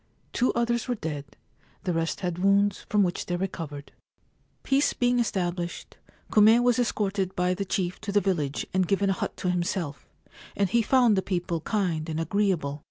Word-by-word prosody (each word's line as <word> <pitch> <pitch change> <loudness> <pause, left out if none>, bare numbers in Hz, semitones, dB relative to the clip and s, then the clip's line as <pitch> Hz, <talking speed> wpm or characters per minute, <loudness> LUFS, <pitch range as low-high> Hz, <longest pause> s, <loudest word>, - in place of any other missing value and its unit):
Two 250 - +2
others 235 0 0
were 245 - 0
dead. 150 -7 -5 0.6
The 180 - -1
rest 165 0 -1
had 175 -2 -2
wounds 200 +1 +2
from 210 -1 +3
which 180 -1 -2
they 175 - -1
recovered. 165 -6 -5 0.7
Peace 275 +2 +2
being 245 0 +2
established, 175 -6 -2 0.4
Kume 220 +3 +6
was 245 0 +3
escorted 195 -5 -1
by 180 0 +1
the 195 +2 -3
chief 185 -2 -2
to 210 -1 -4
the 205 - +4
village 155 -8 -1
and 185 -1 +2
given 195 +1 +2
a - - +2
hut - - -4
to 180 - 0
himself, 175 -4 -3 0.5
and 200 - +2
he 235 - +4
found 240 -1 +4
the 190 - +2
people 175 -3 -2
kind 175 -6 -1
and 160 0 -2
agreeable. 165 -5 0
190 Hz, 175 wpm, -26 LUFS, 175-210 Hz, 0.7 s, Kume